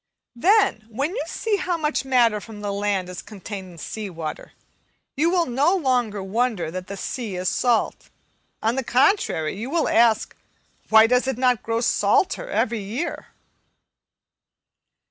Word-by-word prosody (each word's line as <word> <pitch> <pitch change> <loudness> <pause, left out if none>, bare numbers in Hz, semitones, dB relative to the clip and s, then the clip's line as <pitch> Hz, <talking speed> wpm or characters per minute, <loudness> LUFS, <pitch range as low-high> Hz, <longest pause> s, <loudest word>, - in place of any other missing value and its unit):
Then, 350 - +3
when 270 +8 -2
you - - -1
see 435 -2 -1
how 360 -2 -1
much 305 -3 -1
matter 235 -5 +3
from 215 -2 -10
the 205 -1 -3
land 200 -2 -1
is 180 -1 -7
contained 195 -3 -8
in - - -14
sea 210 +5 -6
water, 165 -3 -7 0.6
you 315 +5 +2
will 350 -1 +2
no 285 +8 +2
longer 245 - 0
wonder 215 -3 -1
that 185 +1 -6
the 200 - -6
sea 220 -2 -4
is 180 +1 -3
salt; 240 -3 0 0.5
on 225 +4 +1
the 265 - 0
contrary, 245 - +2
you 225 +6 -5
will 330 +2 +1
ask, 230 -2 +3 0.5
Why 220 0 +8
does 250 +2 +2
it 265 -3 -1
not 250 -2 +2
grow 230 0 -1
salter 305 - +1
every 225 - 0
year? 295 - -4
230 Hz, 155 wpm, -23 LUFS, 205-270 Hz, 0.6 s, Why